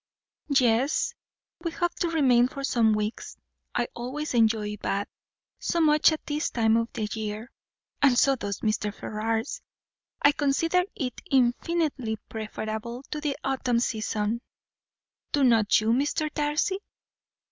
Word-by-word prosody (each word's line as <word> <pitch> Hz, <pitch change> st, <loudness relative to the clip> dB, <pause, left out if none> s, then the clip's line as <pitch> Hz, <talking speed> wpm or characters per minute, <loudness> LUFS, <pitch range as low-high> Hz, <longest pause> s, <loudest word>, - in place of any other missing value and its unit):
"Yes, 250 Hz, +3 st, +2 dB, 0.5 s
we 335 Hz, 0 st, -2 dB
hope 345 Hz, +1 st, -1 dB
to 345 Hz, -, +1 dB
remain 255 Hz, -7 st, +4 dB
for 275 Hz, +1 st, -7 dB
some 230 Hz, -5 st, +3 dB
weeks. 210 Hz, +1 st, -4 dB, 0.4 s
I 240 Hz, -, +1 dB
always 265 Hz, +6 st, -4 dB
enjoy 220 Hz, -3 st, +2 dB
Bath 200 Hz, 0 st, -2 dB, 0.5 s
so 340 Hz, -, -1 dB
much 305 Hz, -1 st, +5 dB
at 315 Hz, -, -4 dB
this 295 Hz, +1 st, -1 dB
time 225 Hz, -2 st, +2 dB
of 230 Hz, 0 st, +1 dB
year; 215 Hz, +2 st, -4 dB, 0.5 s
and 265 Hz, -4 st, +5 dB
so 275 Hz, +1 st, +5 dB
does 205 Hz, -5 st, -4 dB
Mr. 215 Hz, -1 st, 0 dB
Ferrars. 225 Hz, -, -3 dB, 0.6 s
I 285 Hz, -, +6 dB
consider 320 Hz, +5 st, +1 dB
it 255 Hz, -5 st, -4 dB
infinitely 265 Hz, -2 st, +1 dB
preferable 220 Hz, +2 st, -5 dB
to 300 Hz, -, -3 dB
the 295 Hz, -2 st, -1 dB
autumn 260 Hz, -3 st, 0 dB
season, 220 Hz, -1 st, -1 dB, 0.9 s
do 285 Hz, -, +3 dB
not 225 Hz, -5 st, +5 dB
you, 215 Hz, +1 st, -1 dB
Mr. 290 Hz, +5 st, +1 dB
Darcy? 300 Hz, +6 st, 0 dB
245 Hz, 130 wpm, -27 LUFS, 220-295 Hz, 0.9 s, I